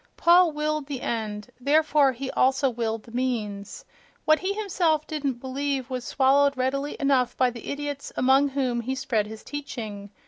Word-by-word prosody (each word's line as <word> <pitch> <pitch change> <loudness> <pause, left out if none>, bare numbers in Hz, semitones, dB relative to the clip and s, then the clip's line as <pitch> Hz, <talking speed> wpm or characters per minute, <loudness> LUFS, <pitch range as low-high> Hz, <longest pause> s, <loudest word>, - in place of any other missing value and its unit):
Paul 345 0 +5
willed 300 -1 -2
the 275 -3 -5
end; 215 -1 -3
therefore 290 0 +3
he 260 +2 -5
also 265 +1 +2
willed 225 -2 -3
the 230 - -15
means.... 220 -5 -3 0.4
What 310 0 +5
he 375 +1 -1
himself 350 -7 0
didn't 290 -4 -2
believe 265 +1 -3
was 250 -2 -3
swallowed 280 +1 +3
readily 275 +3 -1
enough 270 -3 +1
by 255 -1 +3
the 235 -2 -10
idiots 285 0 -4
among 265 +2 +4
whom 260 -3 -1
he 260 +3 -3
spread 220 -5 -1
his 220 0 -9
teaching. 220 -8 -6
265 Hz, 165 wpm, -25 LUFS, 240-290 Hz, 0.4 s, Paul